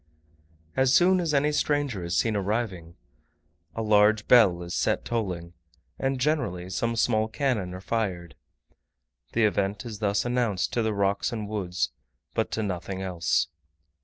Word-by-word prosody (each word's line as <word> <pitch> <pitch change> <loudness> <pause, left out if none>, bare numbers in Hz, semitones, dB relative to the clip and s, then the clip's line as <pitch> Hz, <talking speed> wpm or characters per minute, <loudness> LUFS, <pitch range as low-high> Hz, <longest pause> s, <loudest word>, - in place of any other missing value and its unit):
As 130 -1 +3
soon 185 +4 +5
as 170 -3 0
any 145 +1 +2
stranger 145 -9 0
is 85 +1 -1
seen 110 -2 +1
arriving, 100 -5 -2 0.8
a 115 - -2
large 105 0 +4
bell 100 -8 +5
is 85 - -6
set - - 0
tolling, 90 -7 -3 0.5
and 135 -1 -1
generally 100 - -1
some 115 +4 -1
small 110 -1 +2
cannon 110 -6 -1
are 95 - -8
fired. 95 -6 -2 1.0
The 115 - +2
event 100 0 0
is 110 -4 -7
thus 100 0 0
announced 120 -8 0
to 120 - +1
the 110 -2 0
rocks 100 +4 0
and 110 -3 -4
woods, 95 -4 -2 0.4
but - - 0
to 110 - -1
nothing 95 0 -4
else. 85 -3 0
105 Hz, 150 wpm, -26 LUFS, 95-120 Hz, 1.0 s, soon